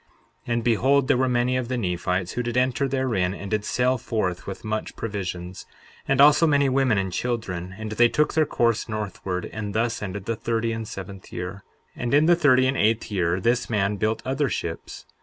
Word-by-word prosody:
63:6 120 - 0
And 115 0 0
behold, 130 +4 +3
there 145 - +3
were 130 0 +2
many 125 +1 +1
of 125 -2 -2
the 125 0 -2
Nephites 90 -2 -1
who 125 - -2
did 120 0 -3
enter 130 +3 +1
therein 120 -9 0
and 100 -1 -8
did 105 -1 0
sail 125 +3 +1
forth 95 -6 -2
with 100 +4 -6
much 110 0 -3
provisions, 95 -4 -5 0.4
and 135 -1 +1
also 150 +3 +7
many 140 -2 +3
women 130 -4 +2
and 95 -2 -1
children; 95 -6 -3
and 110 0 -6
they 120 +2 +4
took 150 +4 +1
their 155 -2 +2
course 115 -1 +1
northward. 100 -4 -4
And 105 0 -5
thus 115 +2 0
ended 100 -1 -5
the 115 - -1
thirty 115 +1 -1
and 115 -1 -4
seventh 95 -1 -9
year. 90 +3 -6 0.3
63:7 - - -7
And 120 - -1
in 150 +2 +5
the 175 +1 +6
thirty 130 -6 +4
and 130 +1 +1
eighth 110 +1 +1
year, 90 -2 +1
this 120 +5 +1
man 105 -2 0
built 110 +3 -1
other 135 +1 0
ships. - - -5
115 Hz, 210 wpm, -24 LUFS, 100-130 Hz, 0.4 s, also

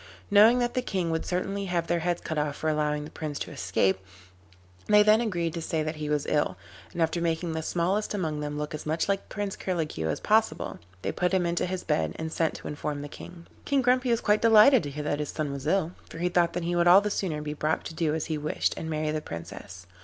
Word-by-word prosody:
Knowing 215 +4 +7
that 240 -1 0
the 255 - 0
King 185 -8 -2
would 160 - -2
certainly 195 +2 -2
have 175 -2 -1
their 170 0 0
heads 175 +1 -1
cut 160 -2 -2
off 150 -1 -1
for 160 - -4
allowing 150 -1 0
the 150 - -10
Prince 150 -2 -5
to - - -5
escape, 95 -6 +1 0.9
they 210 0 +6
then 215 +2 +5
agreed 175 -8 -1
to 170 - -4
say 160 -1 -1
that 155 0 -4
he 150 -1 -4
was 150 -1 0
ill, 120 -11 0 0.3
and 170 - 0
after 165 +1 -1
making 165 0 -1
the 160 - -2
smallest 185 +7 -1
among 160 -6 -2
them 150 0 -4
look 150 +1 -4
as 150 - -6
much 160 +2 0
like 200 -1 -1
Prince 205 -1 -3
Curlicue 160 - -2
as 80 - -1
possible, 220 +1 +1 0.2
they - - -1
put 180 +1 0
him 180 -2 +2
into 170 +1 0
his 185 0 -3
bed 80 -1 0
and 160 0 -5
sent 165 -1 0
to - - -8
inform 145 0 -4
the - - -5
King. 170 +3 -11 0.2
King 280 -2 +1
Grumpy 250 +1 +3
was 235 -1 +2
quite 210 0 +2
delighted 230 +3 +7
to 145 - -5
hear 150 +2 -5
that 145 0 -1
his 150 - -3
son 150 -2 -3
was 140 -1 -5
ill, 185 -4 +1 0.2
for - - -9
he 175 +2 0
thought 175 -1 +2
that 175 - -2
he 175 +1 -1
would 175 0 +3
all 185 +3 +8
the 210 0 -2
sooner 160 -7 -2
be 150 0 -3
brought 155 +1 -1
to - - -6
do 160 -1 0
as 160 - -2
he 155 -2 -2
wished, 150 +1 0
and 160 - -5
marry 155 -1 -1
the 155 0 -2
Princess. 90 - -9
165 Hz, 255 wpm, -27 LUFS, 150-190 Hz, 0.9 s, all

